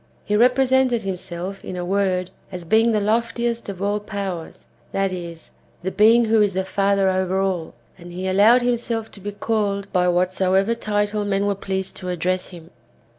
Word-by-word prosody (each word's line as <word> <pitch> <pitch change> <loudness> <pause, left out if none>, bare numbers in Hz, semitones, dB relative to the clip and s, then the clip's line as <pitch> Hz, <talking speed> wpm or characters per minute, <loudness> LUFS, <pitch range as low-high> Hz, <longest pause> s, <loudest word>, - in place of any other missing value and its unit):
He 210 - 0
represented 250 0 +3
himself, 185 0 -5
in 185 - -6
a 180 -1 -4
word, 185 -1 0 0.2
as 180 -2 -7
being 225 +6 +3
the 215 - +2
loftiest 230 +2 -1
of 195 -1 -5
all 205 +1 0
powers, 200 -5 -6 0.3
that 195 -1 0
is, 170 -2 -8 0.3
tlie 190 - -3
Being 225 +3 +5
who 220 0 +3
is 205 -2 +2
the 190 0 0
Father 195 0 +1
over 185 0 +1
all, 185 -7 -2 0.2
and 175 0 -11
he 185 +2 -4
allowed 215 +6 +5
himself 235 -2 -1
to - - -12
be 205 +2 -5
called 205 -2 -2
by 180 0 +3
whatsoever 185 +3 +2
title 210 -2 -1
men 200 0 0
were 205 - +1
pleased 190 -1 -4
to 180 - -6
address 180 +1 -1
him. 170 -2 -13
200 Hz, 175 wpm, -22 LUFS, 185-215 Hz, 0.3 s, Being